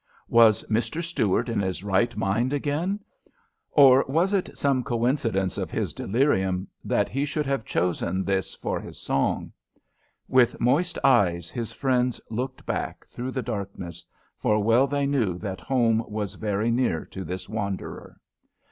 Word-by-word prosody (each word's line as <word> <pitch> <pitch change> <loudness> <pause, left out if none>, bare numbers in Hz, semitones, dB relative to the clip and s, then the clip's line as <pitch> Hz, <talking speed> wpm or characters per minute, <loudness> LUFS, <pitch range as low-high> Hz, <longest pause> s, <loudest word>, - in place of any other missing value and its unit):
Was 115 -3 +6
Mr. 120 +10 -1
Stuart 130 - 0
in 115 -3 -1
his 95 -1 -2
right 100 +3 +1
mind 105 +6 0
again, 155 +8 -1 0.7
or 135 -2 +7
was 170 +8 +1
it 195 -2 -1
some 135 -3 +1
coincidence 115 -6 0
of - - -3
his - - -2
delirium, 95 -6 +1 0.2
that - - +1
he 135 +3 -2
should 150 +1 -1
have 135 -5 -1
chosen 90 +1 0
this 95 -1 -1
for - - -3
his - - -10
song? 70 - -1 0.8
With 130 -2 +3
moist 145 +9 +2
eyes 90 - +3
his 115 -3 -4
friends 125 -2 0
looked 130 +4 -4
back - - -3
through 125 +2 -4
the 130 -1 -3
darkness, 100 -6 -5 0.4
for 105 - +2
well 115 +5 +4
they 140 0 0
knew 120 -11 +1
that 95 -2 -5
home 115 -1 +2
was 105 -2 -3
very 105 +3 -1
near 115 -9 0
to 95 - -7
this 90 +1 -5
wanderer. 100 -3 -5
115 Hz, 150 wpm, -25 LUFS, 95-135 Hz, 0.8 s, or